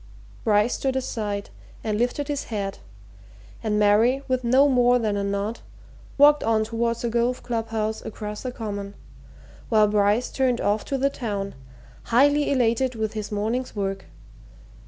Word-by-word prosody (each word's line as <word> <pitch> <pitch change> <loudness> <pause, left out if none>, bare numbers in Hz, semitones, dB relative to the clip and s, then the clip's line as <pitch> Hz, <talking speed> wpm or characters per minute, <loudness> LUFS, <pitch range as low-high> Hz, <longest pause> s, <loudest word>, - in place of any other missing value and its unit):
Bryce 210 +1 +3
stood 265 -1 -1
aside 210 -6 -3 0.3
and 215 -2 -1
lifted 250 +4 -1
his 290 -1 -3
hat, 200 -3 -4 0.8
and 215 -2 0
Mary, 220 +6 +3
with 255 -1 0
no 260 +4 +5
more 245 -2 +4
than 215 -4 -1
a 200 - -1
nod, 200 +3 -2 0.6
walked 295 +1 +6
on 220 -1 +2
towards 230 +1 -2
the 235 - 0
golf 240 +2 0
club 230 -2 -2
house 220 -1 -2
across 210 -1 -6
the 255 - -4
Common, 205 -4 -6 0.7
while 215 -2 +5
Bryce 210 +3 +2
turned 255 -3 +1
off 205 +1 0
to 275 - -2
the 275 +1 +1
town, 200 -6 -4 0.5
highly 285 +5 +3
elated 250 -1 +1
with 220 -1 -2
his 215 -1 -5
morning's 225 +5 -2
work. 195 -1 -3
225 Hz, 155 wpm, -24 LUFS, 210-250 Hz, 0.8 s, walked